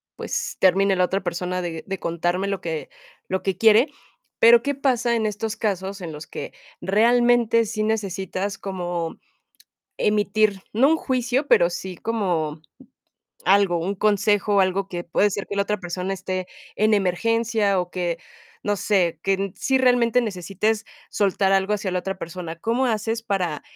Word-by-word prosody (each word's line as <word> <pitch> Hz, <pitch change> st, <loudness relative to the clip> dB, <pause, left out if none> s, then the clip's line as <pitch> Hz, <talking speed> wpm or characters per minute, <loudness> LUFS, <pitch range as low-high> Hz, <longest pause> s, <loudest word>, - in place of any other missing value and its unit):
pues, -, -, -4 dB
termine 195 Hz, +1 st, +4 dB
la 180 Hz, -, +3 dB
otra 195 Hz, +2 st, -2 dB
persona 180 Hz, +1 st, -2 dB
de 165 Hz, -2 st, -5 dB
de 195 Hz, -1 st, -4 dB
contarme 175 Hz, +3 st, -1 dB
lo 195 Hz, -1 st, -2 dB
que 160 Hz, -2 st, -4 dB, 0.4 s
lo 190 Hz, 0 st, -2 dB
que 190 Hz, -2 st, -1 dB
quiere". 225 Hz, +6 st, +6 dB, 0.5 s
Pero 230 Hz, +1 st, +7 dB
¿qué 285 Hz, +3 st, -1 dB
pasa 245 Hz, -3 st, +1 dB
en 220 Hz, -, 0 dB
estos 215 Hz, +1 st, -2 dB
casos 195 Hz, -2 st, -2 dB
en 170 Hz, -, -5 dB
los 150 Hz, 0 st, -9 dB
que -, -, -7 dB, 0.3 s
realmente 230 Hz, +2 st, +3 dB
sí 215 Hz, 0 st, -3 dB
necesitas 195 Hz, -2 st, -2 dB
como 175 Hz, -3 st, -4 dB, 0.8 s
emitir? 210 Hz, -1 st, +1 dB
No 255 Hz, +6 st, +5 dB
un 320 Hz, -, +4 dB
juicio, 255 Hz, +1 st, 0 dB
pero 170 Hz, +1 st, +5 dB
sí 185 Hz, +1 st, -6 dB
como, 170 Hz, -9 st, -2 dB, 0.8 s
algo, 190 Hz, -2 st, +4 dB
un 180 Hz, +4 st, -2 dB
consejo, 205 Hz, 0 st, +2 dB
algo, 190 Hz, +1 st, +1 dB
que 175 Hz, -2 st, -4 dB
puede 205 Hz, +4 st, +2 dB
ser 200 Hz, 0 st, -4 dB
que 200 Hz, -, -4 dB
la 200 Hz, -, +3 dB
otra 210 Hz, +1 st, -2 dB
persona 180 Hz, +2 st, -3 dB
esté 185 Hz, -1 st, -4 dB, 0.3 s
en 215 Hz, +1 st, +3 dB
emergencia 210 Hz, +1 st, +1 dB
o 180 Hz, 0 st, -5 dB
que 175 Hz, -2 st, -2 dB, 0.5 s
no 205 Hz, -, +1 dB
sé, 180 Hz, -6 st, +1 dB
que 195 Hz, 0 st, 0 dB
sí 265 Hz, -1 st, +1 dB
realmente 245 Hz, -2 st, +3 dB
necesites 210 Hz, +1 st, -1 dB, 0.3 s
soltar 195 Hz, -1 st, +1 dB
algo 195 Hz, +1 st, +2 dB
hacia 200 Hz, -2 st, -1 dB
la 180 Hz, -, 0 dB
otra 190 Hz, +1 st, -5 dB
persona, 170 Hz, -2 st, -6 dB
¿cómo 235 Hz, +8 st, 0 dB
haces 225 Hz, 0 st, -1 dB
para 180 Hz, -8 st, -2 dB
195 Hz, 160 wpm, -23 LUFS, 180-220 Hz, 0.8 s, Pero